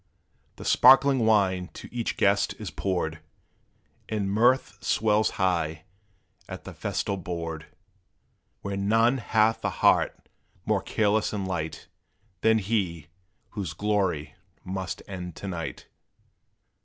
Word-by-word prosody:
The - - -10
sparkling 135 -3 +6
wine 95 -4 +2
to - - -9
each 120 -2 -2
guest 100 0 +2
is - - -6
poured, 85 -4 -2 0.9
And 100 -3 -1
mirth 120 +5 +2
swells 110 0 +2
high 80 -4 0 0.7
at - - -7
the - - -9
festal 100 - -2
board, 85 -4 -5 0.9
Where 100 0 -4
none 115 +6 +3
hath 110 0 +2
the - - 0
heart - - +2 0.4
more - - +1
careless 110 0 +1
and 100 -2 -2
light, 80 -4 -4 0.6
Than 110 0 +4
he, 95 -7 -2 0.4
whose 95 -8 -5
glory 95 -6 0 0.3
must 95 0 -4
end 90 -3 -7
to 100 - -7
night. 85 -3 -5
100 Hz, 120 wpm, -26 LUFS, 90-110 Hz, 0.9 s, sparkling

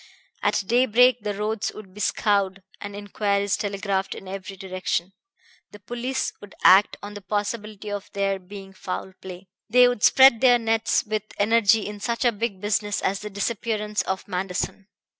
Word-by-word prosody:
At - - +1
daybreak 245 +2 +4
the 205 -1 -3
roads 210 +1 -2
would 195 -3 -11
be 210 - -12
scoured 200 -2 0 0.2
and 205 0 -7
inquiries 205 -1 -1
telegraphed 200 -2 -2
in 195 - -10
every 195 0 -7
direction. 185 -1 -3 0.6
The 205 - -13
police 245 +5 -3
would 205 -1 -13
act 195 +2 +6
on 205 0 -7
the 205 - -8
possibility 210 +1 -4
of 205 -1 -5
there 195 -1 0
being 195 +1 -11
foul 190 0 -6
play. 185 +1 -9 0.2
They 250 +2 +6
would 245 -4 -1
spread 265 -1 +6
their 250 -2 +6
nets 225 -1 +1
with 215 0 -1 0.2
energy 220 0 +3
in 210 0 -6
such 235 +4 -2
a 240 - +5
big 210 -2 -3
business 205 0 -1
as 195 +1 0
the 210 - -7
disappearance 210 +1 -2
of 190 0 -4
Manderson. 190 +1 -3
205 Hz, 165 wpm, -24 LUFS, 195-220 Hz, 0.6 s, act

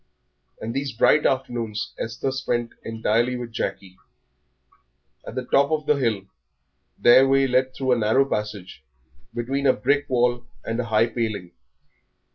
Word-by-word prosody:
And 115 +1 -5
these 135 0 -3
bright 150 +6 +4
afternoons 120 -5 -2
Esther 115 +4 -3
spent 120 -3 -2
entirely 115 +2 0
with 120 -1 -6
Jackie. 95 -4 -5 1.3
At - - -7
the 130 - -3
top 140 +3 +3
of 155 -1 -1
the 150 - +4
hill 115 -8 0 0.7
their 130 +3 +6
way 135 0 +4
led 130 0 +1
through 130 -1 -1
a 125 - +4
narrow 110 +5 +3
passage 105 - -5 0.5
between 135 +4 -1
a 130 - +6
brick 145 +6 0
wall 120 -1 +1 0.2
and 115 +1 -2
a 125 - -1
high 110 0 +3
paling. 110 -6 -3
120 Hz, 145 wpm, -23 LUFS, 110-135 Hz, 1.3 s, their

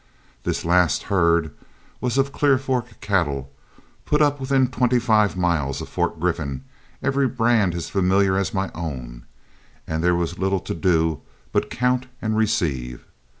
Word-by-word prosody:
This - - -2
last 90 -1 +3
herd 85 -4 +2 0.5
was 125 +1 -1
of 135 +1 +2
Clear 140 -2 +3
Fork 125 -4 -3
cattle, 70 -9 -1 0.5
put 150 - +1
up 145 -1 +3
within 130 -1 +2
twenty 125 -1 +1
five 110 -5 +2
miles 80 -6 0
of - - -7
Fort - - -1
Griffin, 75 -6 -2 0.4
every 135 0 +2
brand 115 -7 +2
as 85 - -4
familiar 95 0 +2
as 95 -3 0
my 95 0 -2
own, 60 -8 -6 0.6
and 80 0 -3
there 90 0 +3
was 85 0 -2
little 95 0 +1
to - - -4
do 80 -3 +1 0.3
but - - 0
count 125 +1 0
and 110 -2 -1
receive. 70 - -1
95 Hz, 150 wpm, -23 LUFS, 80-125 Hz, 0.6 s, last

